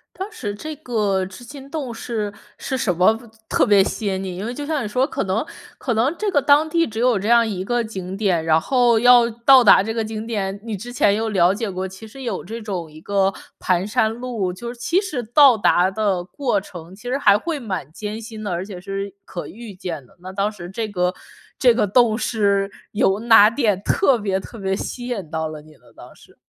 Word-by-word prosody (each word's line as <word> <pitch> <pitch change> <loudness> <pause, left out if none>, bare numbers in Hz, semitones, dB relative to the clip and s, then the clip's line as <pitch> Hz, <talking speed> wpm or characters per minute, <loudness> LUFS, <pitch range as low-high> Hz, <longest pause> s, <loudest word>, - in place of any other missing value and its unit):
当 385 +3 -5
时 205 -4 -5
这 310 +9 -6
个 210 -9 -1
织 195 +6 -12
金 275 +2 -11
洞 280 -6 -4
是 220 -3 -4 0.3
是 265 - -3
什 190 -8 0
么， 185 +5 +4 0.3
特 - - +3
别 205 -3 +6
吸 215 +1 -4
引 190 -1 -1
你？ 185 -2 -5
因 190 - -5
为 235 - -3
就 290 +3 -6
像 305 -2 -1
你 215 - -4
说， 255 +6 +1
可 290 - -3
能 195 +6 -1 0.3
可 245 - -2
能 245 +8 +1
这 425 -1 0
个 285 - +4
当 295 +3 +4
地 335 +1 +2
只 220 0 -7
有 240 -3 +3
这 205 - -3
样 235 0 +5
一 190 -4 -3
个 240 +3 0
景 190 -4 -6
点， 190 -6 +1
然 160 0 +3
后 245 +1 +3
要 240 0 +6
到 240 +3 +6
达 205 - +7
这 225 +2 -4
个 225 -1 -1
景 215 0 -5
点， 200 -4 -3
你 225 -3 -4
之 240 +6 -8
前 205 -4 +3
又 220 +2 -1
了 185 -3 +3
解 220 0 -3
过， 185 0 -3
其 190 +4 -10
实 270 +5 -11
有 230 -7 -4
这 225 +5 -7
种 185 -7 -5
一 155 +1 -13
个 195 +2 +1 0.3
盘 185 +1 +1
山 220 0 +1
路， 230 -6 -3
就 235 +6 -7
是 245 - -15
其 345 +9 +2
实 315 - -4
到 245 +2 +6
达 185 -3 +3
的 195 -3 -1
过 240 0 -1
程 175 -2 -11
其 210 - -17
实 245 +2 -2
还 205 -6 +5
会 330 +5 -3
蛮 190 - -5
艰 210 +5 -6
辛 220 -1 -9
的， 205 - -4
而 175 +1 -2
且 195 -3 -9
是 195 +1 -5
可 175 - -7
预 220 -2 -10
见 170 -6 -6
的。 125 - -24
那 185 +1 -9
当 200 +2 0
时 175 -5 -9
这 220 +3 -4
个 180 -2 -1 0.5
这 250 -2 +6
个 225 - +2
洞 225 +2 +3
是 200 -4 +1 0.2
有 205 -1 +1
哪 225 -2 +7
点 220 -5 0
特 275 -10 +3
别 195 -2 -1
特 230 - -11
别 195 -1 -1
吸 245 +5 -5
引 200 -10 -4
到 160 0 -2
了 155 -1 -7
你 155 - -18
呢 - - -23
当 - - -13
时？ - - -20
215 Hz, 255 characters per minute, -21 LUFS, 190-240 Hz, 0.5 s, 达